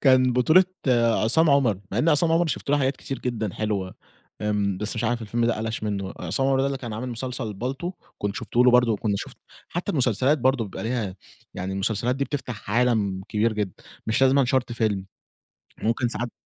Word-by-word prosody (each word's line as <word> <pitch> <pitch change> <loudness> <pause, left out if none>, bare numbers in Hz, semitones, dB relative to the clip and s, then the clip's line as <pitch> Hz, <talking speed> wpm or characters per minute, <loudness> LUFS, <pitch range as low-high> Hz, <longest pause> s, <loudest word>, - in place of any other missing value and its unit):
كان 130 -2 +5
بطولة 155 +9 +5 0.6
عصام 155 +8 +4
عمر، 125 -9 +3
مع 105 - 0
إن 150 - +2
عصام 165 +1 +3
عمر 170 +1 +3
شُفت 140 - -3
له 145 - +4
حاجات 135 -1 +1
كتير 135 - -5
جدًا 110 -6 -3
حلوة 100 -4 -2 0.5
آمم، 105 -2 0
بس 105 +3 -2
مش 115 - -1
عارف 120 +1 0
الفيلم 115 +2 -1
ده 115 - +1
قلش 110 0 -3
منه 100 -2 -2
بقى - - -8
عصام 135 - 0
عمر 135 -1 +3
ده 135 - +2
اللي 140 -1 -2
كان 120 -4 -6
عامل 115 +4 -4
مسلسل 125 -1 -3
بالطو 135 - -4 0.3
كنت 100 0 -2
شُفته 120 +1 +1
له 125 - +7
برضه 125 -1 +5
وكنت 105 0 -1
شُفت - - -7 0.3
حتى 175 - -3
المسلسلات 130 +1 +2
برضه 130 -2 +2
بيبقى 100 - -7
ليها 110 -5 -2 0.4
يعني 95 +1 -4
المسلسلات 110 +6 0
دي 140 - 0
بتفتح 125 -9 -5
عالم 110 -5 +1
كبير 110 +1 +1
جدًا، 105 -4 -2 0.3
مش 110 +4 +1
لازمًا 135 +1 +5
شرط 130 -1 0
فيلم 105 -5 -1 0.8
ممكن 115 +2 +1
ساعات 120 0 -4
120 Hz, 200 wpm, -25 LUFS, 105-130 Hz, 0.8 s, له